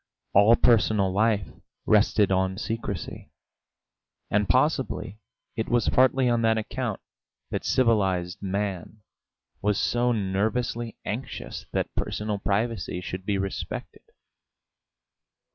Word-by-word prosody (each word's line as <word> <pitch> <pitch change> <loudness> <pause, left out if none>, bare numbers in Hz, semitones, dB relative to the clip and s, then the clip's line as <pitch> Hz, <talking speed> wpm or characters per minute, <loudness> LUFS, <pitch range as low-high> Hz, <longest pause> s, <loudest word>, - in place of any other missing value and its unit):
All 105 +4 +7
personal 105 -5 +3
life 105 -2 +2 0.4
rested 105 -1 +3
on 95 0 +1
secrecy, 110 -5 -5 1.0
and 105 -2 +1
possibly 105 +3 +1 0.4
it 110 -2 -2
was 120 -2 +2
partly 130 0 +4
on 120 -1 +2
that 115 0 +3
account 110 - -3 0.5
that - - -2
civilised 95 -7 +1
man 100 0 -3 0.6
was 105 -1 +1
so 120 +1 +1
nervously 110 +3 -1
anxious - - -5
that - - -1
personal 105 -1 -2
privacy 105 -2 -1
should 90 +1 -6
be 100 -1 +1
respected. 95 0 -5
105 Hz, 105 wpm, -26 LUFS, 95-115 Hz, 1.0 s, All